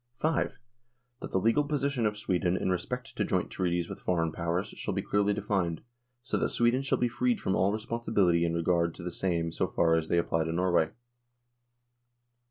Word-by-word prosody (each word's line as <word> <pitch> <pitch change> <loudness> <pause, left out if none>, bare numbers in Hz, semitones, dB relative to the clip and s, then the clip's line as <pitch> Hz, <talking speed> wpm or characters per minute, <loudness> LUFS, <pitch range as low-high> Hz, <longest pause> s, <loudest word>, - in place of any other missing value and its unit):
V. 155 - +2 0.9
That - - -6
the - - 0
legal 115 +9 +3
position 140 -5 0
of 105 0 -3
Sweden 90 -3 0
in 95 - 0
respect 125 +8 -3
to - - 0
Joint - - -1
Treaties 85 -2 -1
with - - -7
Foreign 85 -3 0
Powers 85 +5 -2
shall - - -4
be 100 - -1
clearly 105 0 +1
defined, 95 -5 -1 0.4
so 125 - -1
that - - 0
Sweden 120 +2 +2
shall 135 - +1
be 125 - +2
freed 120 0 0
from 95 - 0
all 95 +2 +3
responsibility 110 -5 +1
in 85 0 0
regard 85 0 +1
to - - -9
the 90 - -4
same 85 -2 -1
so - - 0
far 85 -1 +2
as 80 -1 +1
they 85 - +1
apply 80 -1 +1
to 80 - -2
Norway. 85 -2 +2
95 Hz, 190 wpm, -29 LUFS, 85-110 Hz, 0.9 s, legal